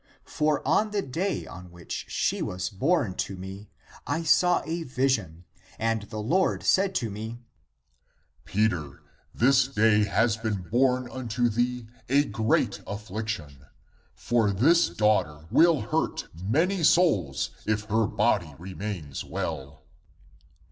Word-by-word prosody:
For 150 -1 0
on 215 - +3
the 205 -2 -1
day 180 +9 -2
on 90 -1 -10
which 85 -1 -7
she - - 0
was 90 +4 -3
born 130 - +1
to 95 - -2
me, 95 +2 -9 0.4
I 165 - -1
saw 180 +2 +3
a 165 +2 -3
vision 125 - -1 0.3
and 115 -1 0
the 110 - -6
Lord 155 - +1
said 195 0 +2
to 115 - -1
me, 110 +3 -6 0.6
' 75 +5 -40
Peter, 90 -10 -1 0.3
this 130 +1 +3
day 110 -4 +3
has 115 +1 +1
been 110 -4 -3
born 125 +5 +1
unto 120 -1 -1
thee 120 +1 -1 0.2
a 140 +2 +4
great 110 -3 0
(p. - - -19
132) - - -12
affliction, 100 -9 -5 0.5
for 115 -3 +1
this 145 - +4
(i. - - -14
e. - - -20
daughter) 85 -8 +1
will 165 -3 +5
hurt 105 - -2
many 165 - +1
souls, 105 - +3 0.2
if 105 0 0
her 110 0 +1
body 105 -8 0
remains 90 -5 -6
well 70 +1 -5
110 Hz, 140 wpm, -27 LUFS, 95-135 Hz, 0.6 s, will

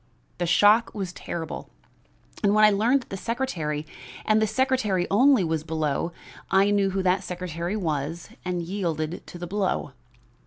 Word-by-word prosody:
The 175 - 0
shock 210 +7 +4
was 190 -4 -4
terrible, 165 -3 -6 0.7
and 205 0 +3
when 215 - +5
I 210 - +8
learned 235 +7 +3
that - - -28
the 195 - -3
secretary, 175 - -2 0.4
and 215 0 +3
the 220 - +3
secretary 220 -6 +1
only, 255 +1 +5
was 160 -2 -1
below, 155 0 -1 0.4
I 195 +1 +4
knew 200 -1 +2
who 190 0 -1
that 185 +1 +2
secretary 175 +1 -4
was 160 -2 -3
and 180 -1 -2
yielded 170 -3 -3
to - - -9
the 175 - -5
blow. 190 -5 -1
185 Hz, 160 wpm, -25 LUFS, 170-210 Hz, 0.7 s, I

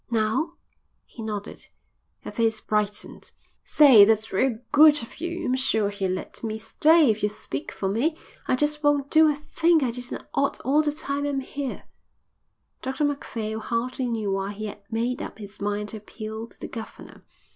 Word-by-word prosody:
"Now?" 235 +8 0 0.5
He 235 - -11
nodded. 210 -1 -6 0.6
Her - - -6
face 225 -2 +1
brightened. 210 -1 -3 0.3
"Say, 270 -9 +8
that's 220 +1 +2
real 235 +4 +2
good 295 -2 +7
of 230 - -12
you. 345 0 -3
I'm 255 - +1
sure 220 -6 +1
he'll 200 -2 -2
let 185 +5 -5
me 220 -1 -2
stay 305 +5 +4
if 215 +1 -4
you 210 - +2
speak 145 -9 -6
for 195 - -3
me. 260 - 0 0.3
I - - +3
just 295 +2 0
won't 290 -2 +2
do 315 0 +6
a 295 - +1
thing 320 +2 +2
I 245 - 0
didn't 245 +1 -6
ought 280 0 0
all 285 +4 +3
the 300 -1 0
time 285 -1 -3
I'm 275 -2 -1
here." 275 0 -5 1.0
Dr 265 +3 -1
Macphail 225 -6 -3
hardly 245 +3 -2
knew 220 -4 -1
why 195 +1 -2
he 215 +1 -6
had 210 -1 -7
made 235 +3 -1
up - - -7
his 205 -2 -11
mind 205 +1 -2
to 220 - -6
appeal 220 +1 -7
to - - -23
the - - -6
governor. 225 -1 -10
230 Hz, 180 wpm, -25 LUFS, 215-285 Hz, 1.0 s, Say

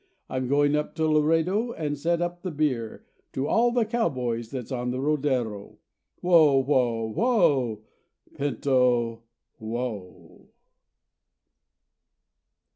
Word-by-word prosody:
I'm 130 -1 -2
going 145 +2 +2
up 150 0 -2
to 160 - 0
Laredo 165 +9 +1
and 150 -2 -3
set 170 +4 0
up 175 0 -4
the 185 - -4
beer 140 -8 -2 0.3
To 135 +2 -2
all 240 +1 +3
the 240 -2 +1
cowboys 125 - -2
that's 125 -2 -6
on 125 -1 -2
the 125 +1 -3
rodero. 130 -8 -1 0.4
Whoa! 160 -6 +5
Whoa! 120 -5 0
Whoa! 140 - +2 0.5
Pinto, 125 -5 +1 0.4
whoa! 110 -4 -7
140 Hz, 110 wpm, -26 LUFS, 120-165 Hz, 0.5 s, Whoa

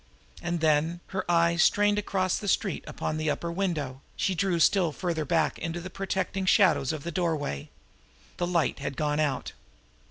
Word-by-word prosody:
And 175 -1 -2
then, 160 +2 +2
her 190 -2 -4
eyes 170 0 +3
strained 205 +2 +4
across 190 -3 0
the 205 - -6
street 195 -1 0
upon 155 - -3
that 155 0 -2
upper 170 +3 -2
window, 155 -8 -2
she 190 - 0
drew 180 -1 0
still 175 0 +4
farther 165 -1 -2
back 165 -1 +1
into 165 +1 -3
the 180 +2 -8
protecting 190 0 -2
shadows 185 - +4
of 155 -3 -5
the 170 - -4
doorway. 155 - -2 0.7
The 175 - -1
light 170 -5 +1
had 135 - -4
gone 150 -1 0
out. 145 -4 -1
170 Hz, 170 wpm, -28 LUFS, 155-185 Hz, 0.7 s, strained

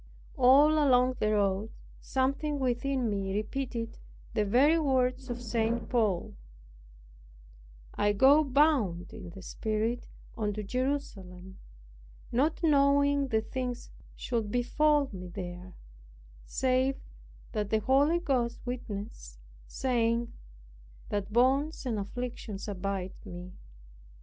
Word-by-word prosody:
All 290 +4 +6
along 255 -2 +3
the 215 - +1
road 200 +1 +1 0.3
something 275 +3 -1
within 260 0 0
me 195 -2 -2
repeated 230 +1 -3 0.3
the 210 - +1
very 270 +10 +4
words 260 -2 0
of 240 0 -4
St. 230 0 -1
Paul, 215 -8 0 1.6
"I 205 - +2
go 275 +8 +6
bound 265 - +2
in 195 -5 -9
the 185 +2 -11
Spirit 220 +4 -2 0.3
unto 210 -1 -2
Jerusalem, 195 -7 -4 0.7
not 295 +8 +1
knowing 280 -2 +3
the 220 -3 +1
things 250 +1 -5 0.2
should 230 -4 -2
befall 290 +5 +2
me 180 -1 -7
there, 180 0 -8 0.7
save 260 +1 +1 0.5
that 210 -2 -2
the 220 0 +1
Holy 280 +8 +3
Ghost 255 -8 0
witnesseth, 210 - -6 0.3
saying 235 - 0 0.8
that 205 0 -3
bonds 270 +7 +2
and 230 -4 -1
afflictions 220 -1 -5
abide 195 -1 -3
me. 180 +1 -9
240 Hz, 105 wpm, -29 LUFS, 205-270 Hz, 1.6 s, All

